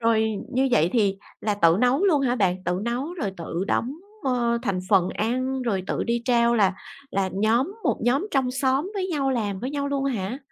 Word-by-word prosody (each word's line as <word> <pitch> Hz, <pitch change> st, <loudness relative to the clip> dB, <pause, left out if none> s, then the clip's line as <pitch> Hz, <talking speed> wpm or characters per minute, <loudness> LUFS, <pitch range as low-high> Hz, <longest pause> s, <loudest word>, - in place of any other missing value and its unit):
Rồi 225 Hz, -1 st, +3 dB, 0.3 s
như 265 Hz, +1 st, +2 dB
vậy 170 Hz, -5 st, +3 dB
thì 200 Hz, -5 st, +2 dB, 0.2 s
là 210 Hz, -1 st, 0 dB
tự 170 Hz, -4 st, +4 dB
nấu 255 Hz, +9 st, +3 dB
luôn 310 Hz, -8 st, +4 dB
hả 250 Hz, -2 st, +1 dB
bạn, 185 Hz, -3 st, 0 dB
tự 180 Hz, +1 st, 0 dB
nấu 255 Hz, +8 st, -2 dB
rồi 210 Hz, -, -3 dB
tự 170 Hz, +2 st, -3 dB
đóng, 250 Hz, +4 st, 0 dB, 0.3 s
ờ, 240 Hz, -3 st, +1 dB
thành 190 Hz, -2 st, -1 dB
phần 185 Hz, -2 st, +4 dB
ăn, 255 Hz, +4 st, -1 dB
rồi 200 Hz, -6 st, -1 dB
tự -, -, -1 dB
đi 235 Hz, 0 st, -1 dB
trao 235 Hz, -1 st, +3 dB
là 195 Hz, -4 st, +3 dB, 0.4 s
là 195 Hz, -1 st, 0 dB
nhóm 230 Hz, -, +1 dB
một -, -, +1 dB
nhóm 270 Hz, +10 st, +2 dB
trong 265 Hz, -3 st, +1 dB
xóm 270 Hz, +7 st, 0 dB
với 375 Hz, -2 st, -1 dB
nhau, 280 Hz, -5 st, 0 dB
làm 205 Hz, -6 st, -2 dB
với 255 Hz, +3 st, -3 dB
nhau 280 Hz, -1 st, -2 dB
luôn 275 Hz, -1 st, -1 dB
hả? 235 Hz, -2 st, -2 dB
235 Hz, 210 wpm, -24 LUFS, 200-270 Hz, 0.4 s, tự